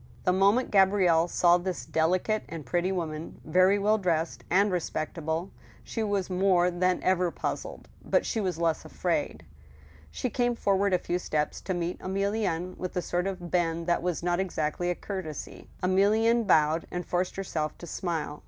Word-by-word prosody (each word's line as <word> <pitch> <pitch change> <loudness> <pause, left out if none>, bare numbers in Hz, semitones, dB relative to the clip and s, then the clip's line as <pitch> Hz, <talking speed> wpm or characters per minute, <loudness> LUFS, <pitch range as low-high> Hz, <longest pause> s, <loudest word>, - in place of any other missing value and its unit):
The 180 - +3
moment 200 +7 +3
Gabrielle 190 -4 +4
saw 175 0 +4
this 180 0 -4
delicate 185 +7 +1
and 160 -2 -7
pretty 175 +8 0
woman, 160 -4 -4
very 185 +5 +4
well 210 +2 +2
dressed, 170 -3 -1
and 200 +3 +3
respectable, 165 0 -3 0.3
she 225 - -4
was 205 -3 0
more 180 -1 +3
than 180 +1 0
ever 185 -1 +2
puzzled, - - -5 0.2
but - - +1
she 225 - -1
was 185 -4 -1
less 165 -1 0
afraid. 155 - -2 0.6
She 235 - -3
came 245 0 +1
forward 200 -2 +1
a - - +3
few 175 0 -2
steps 150 -3 -2
to 185 - -3
meet 175 0 -3
Emilienne, 190 -2 -1
with 185 0 -5
a - - +1
sort 175 +3 -1
of 180 -3 -5
bend 170 -2 0
that 175 0 +1
was 175 -1 -2
not 175 0 +1
exactly 175 -2 -1
a 175 - 0
courtesy. 185 -7 -7
Emilienne 215 +5 +3
bowed, 155 -2 +3
and 180 0 -4
forced 180 +1 -1
herself 160 -6 -3
to - - -9
smile. 160 -3 -3
180 Hz, 170 wpm, -28 LUFS, 170-195 Hz, 0.6 s, Gabrielle